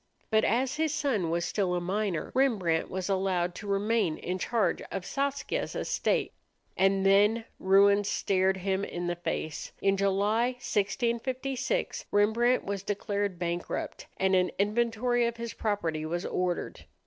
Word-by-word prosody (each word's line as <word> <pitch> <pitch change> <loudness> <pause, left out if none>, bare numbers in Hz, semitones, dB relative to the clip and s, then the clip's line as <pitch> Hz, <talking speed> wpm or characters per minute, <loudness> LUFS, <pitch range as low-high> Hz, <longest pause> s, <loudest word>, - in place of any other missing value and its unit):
But 220 0 +4
as 250 +6 +1
his 315 -1 +1
son 235 - 0
was 170 +1 0
still 185 -1 0
a - - +1
minor, 190 -1 -2
Rembrandt 205 -12 +1
was 185 -1 -3
allowed 185 -3 0
to 205 - -8
remain 200 -3 +1
in 185 +1 -4
charge 225 +2 0
of 195 -2 -4
Saskia's 280 0 -2
estate. - - 0 0.4
And 195 0 +2
then 205 +4 +4
ruin 200 +2 +5
stared 190 -1 +1
him 190 +1 -1
in 175 -3 -4
the 175 0 -1
face. 160 -2 -4
In 195 0 +2
July, 205 +5 +2
1656, 250 - -1
Rembrandt 225 +5 +3
was 200 -1 -3
declared 200 -1 -2
bankrupt, 175 0 -4
and 190 0 +2
an 180 -1 +3
inventory 235 +3 +1
of 235 0 -4
his 235 0 -5
property 170 -8 -2
was 170 +3 -3
ordered. 180 -1 -2
200 Hz, 145 wpm, -29 LUFS, 185-230 Hz, 0.4 s, ruin